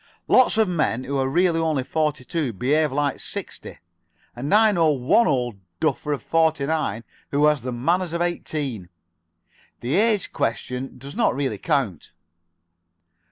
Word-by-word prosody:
Lots 255 -3 +5
of 220 -2 +4
men 155 -8 0
who 140 - -4
are 135 - +1
really 170 +2 +2
only 155 -5 0
forty 150 -2 -1
two 150 -7 -2
behave 145 +8 +1
like 145 +1 -1
sixty, - - -6 0.6
and 130 +4 -4
I 215 +1 +6
know 165 -5 +3
one 140 - +3
old 120 -6 -1 0.2
duffer 150 - -1
of 145 - -2
forty 160 -3 +2
nine 140 -8 -1 0.3
who 145 +1 +2
has 150 -3 +3
the 125 +2 -4
manners 170 +9 0
of 170 - -2
eighteen. 145 - -3 0.9
The 125 +4 -2
age 215 -2 +2
question 125 +3 -3
does 140 +3 -10
not - - +2
really 140 -1 -2
count." 130 - -1
145 Hz, 155 wpm, -23 LUFS, 130-165 Hz, 0.9 s, I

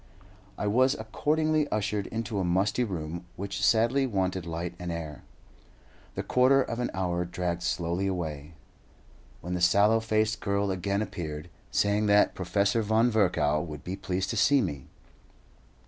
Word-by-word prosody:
I - - -3
was 130 +6 +3
accordingly 150 +7 0
ushered 105 -2 -1
into 115 -2 -3
a - - 0
musty 95 +7 +1
room, 85 -4 -5
which 100 0 -4
sadly 120 +6 +3
wanted 95 -5 -1
light 85 +1 -4
and 90 -1 -4
air. 80 -3 -6 0.9
The - - -3
quarter 130 +2 +4
of 120 -3 -2
an 125 - -1
hour 90 -2 -1
dragged 90 0 -3
slowly 90 +2 -1
away, 80 -4 -4 0.9
when 90 +2 -5
the 90 - -2
sallow 100 +5 +4
faced 110 0 0
girl 100 -1 0
again 100 +2 -1
appeared, 80 -5 -6 0.2
saying 105 +1 +1
that 105 0 +4
Professor 100 +4 +1
Von 110 +3 +2
Virchow 80 -8 +2
would 75 -4 -7
be 90 - -4
pleased 95 0 -2
to 115 - -3
see 140 +6 +4
me. 75 - -3
100 Hz, 150 wpm, -28 LUFS, 90-110 Hz, 0.9 s, quarter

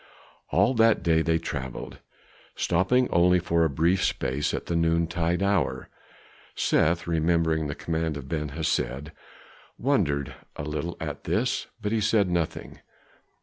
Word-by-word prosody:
All 100 +8 +3
that 115 -2 +3
day 80 -2 +3
they 80 0 +2
traveled, 65 -6 -6 0.6
stopping 95 +9 +2
only 90 +1 +4
for 85 -1 +1
a 80 - +2
brief 85 +7 +1
space 75 +3 0
at - - -4
the 85 - -2
noontide 85 +2 +1
hour. 80 -10 0 0.7
Seth, 85 +2 +2
remembering 80 -1 +1
the 75 - -4
command 80 -2 -2
of 70 -2 -8
Ben 75 -2 -2
Hesed, 75 -2 -1 0.7
wondered 80 - 0 0.2
a - - -5
little 75 +3 -4
at - - -6
this, - - 0
but 105 - -3
he 110 -1 +1
said 105 -3 +2
nothing. 85 -3 -3
85 Hz, 140 wpm, -26 LUFS, 75-90 Hz, 0.7 s, only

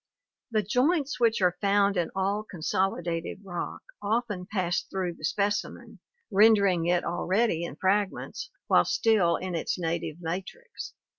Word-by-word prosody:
The 215 -2 +1
joints 280 - +1
which 230 -4 +3
are 180 -1 +2
found 200 0 +3
in 175 -2 0
all 195 +2 0
consolidated 175 -2 -2
rock 175 -3 -5 0.2
often 210 -4 -1
pass 180 -4 0
through 185 -2 -3
the - - -17
specimen, 205 0 -2 0.3
rendering 200 -4 +5
it 175 0 +2
already 175 +1 0
in 170 - -5
fragments 205 - -1 0.2
while - - +5
still 205 -7 +3
in 185 +1 -4
its 165 - -1
native 165 -2 -2
matrix. 190 - -6
195 Hz, 135 wpm, -28 LUFS, 175-215 Hz, 0.3 s, rendering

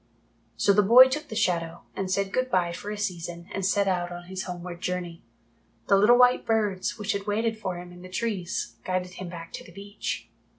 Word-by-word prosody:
So 200 - +4
the 210 - +5
boy 245 +6 +8
took 300 +3 -3
the 220 - -7
Shadow, 170 -5 0
and 190 -1 -3
said 195 +1 0
good 255 0 +1
bye 180 -6 +2
for 180 +4 -6
a 210 - -4
season 175 -3 -4
and 195 - -3
set 200 +1 +2
out 175 -2 0
on 175 0 -7
his 190 +1 -5
homeward 175 -1 -7
journey. 180 -2 -3 0.7
The - - +7
little 210 +5 +6
white 250 0 +5
birds, 210 -2 0
which 210 -1 -2
had 200 0 -3
waited 220 +2 0
for 185 -4 -3
him 175 0 -9
in 175 0 -13
the 185 - -10
trees, 185 - -3
guided 185 -1 -2
him 185 -1 -7
back 170 -1 -9
to - - -6
the - - -14
beach. 200 +3 -5
190 Hz, 215 wpm, -27 LUFS, 175-210 Hz, 0.7 s, boy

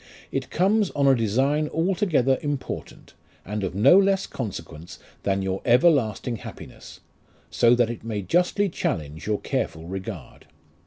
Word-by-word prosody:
It - - -3
comes 200 +3 +2
on 140 - +2
a 135 - +7
design 135 +7 +1
altogether 165 - +1
important, 145 -2 -5 0.3
and 105 +1 -4
of 95 -1 -3
no 135 - +6
less 195 -1 +2
consequence 85 - -7 0.2
than 95 -1 0
your 95 0 -2
everlasting 125 - +2
happiness, - - -11 0.5
so 120 0 +4
that 120 -1 +2
it 115 - -8
may 110 -3 -4
justly 180 - +1
challenge 80 - -4
your 105 -1 0
careful 80 0 -3
regard. 95 - -8
120 Hz, 140 wpm, -24 LUFS, 100-155 Hz, 0.5 s, a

